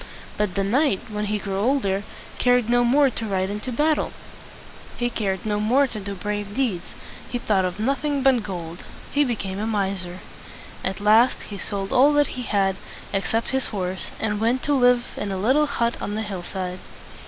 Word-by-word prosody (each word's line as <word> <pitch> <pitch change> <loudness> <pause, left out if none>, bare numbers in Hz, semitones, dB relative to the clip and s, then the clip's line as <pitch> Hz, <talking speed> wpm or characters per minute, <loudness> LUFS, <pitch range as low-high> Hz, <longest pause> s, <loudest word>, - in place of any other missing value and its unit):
But 205 -3 -1
the 195 - +1
knight, 235 +1 +2
when 210 0 -2
he 210 +1 0
grew 195 -1 -3
older, 205 -5 +1 0.4
cared 245 -2 +4
no 245 0 +4
more 270 +3 +4
to 225 - -4
ride 190 -1 0
into 210 +5 -4
battle; 300 +5 +1 0.9
he 240 0 0
cared 195 -4 -2
no 210 -1 0
more 250 +7 +4
to 230 -5 -5
do 200 0 -5
brave 205 +1 -4
deeds; 225 -10 -1 0.3
he 245 - -1
thought 205 -5 +1
of 180 +2 -3
nothing 275 +4 0
but 265 -3 +4
gold; 175 -4 -6 0.3
he 290 - +3
became 200 -7 -2
a 215 - -1
miser. 195 -4 -2 0.7
At 190 +1 -3
last 220 +4 +4
he 200 -1 -7
sold 195 +1 -3
all 270 +3 +6
that 290 0 +2
he 255 - -4
had, 195 -5 +1 0.4
except 220 +3 0
his 265 0 0
horse, 185 -2 -3
and 210 -1 -1
went 240 +3 +1
to 290 - +2
live 245 -2 +4
in 205 - -3
a 190 - -2
little 265 +10 +3
hut 235 -4 0
on 205 - -3
the 220 - -1
hill 200 -4 -4
side. 185 0 -5
210 Hz, 190 wpm, -24 LUFS, 195-250 Hz, 0.9 s, all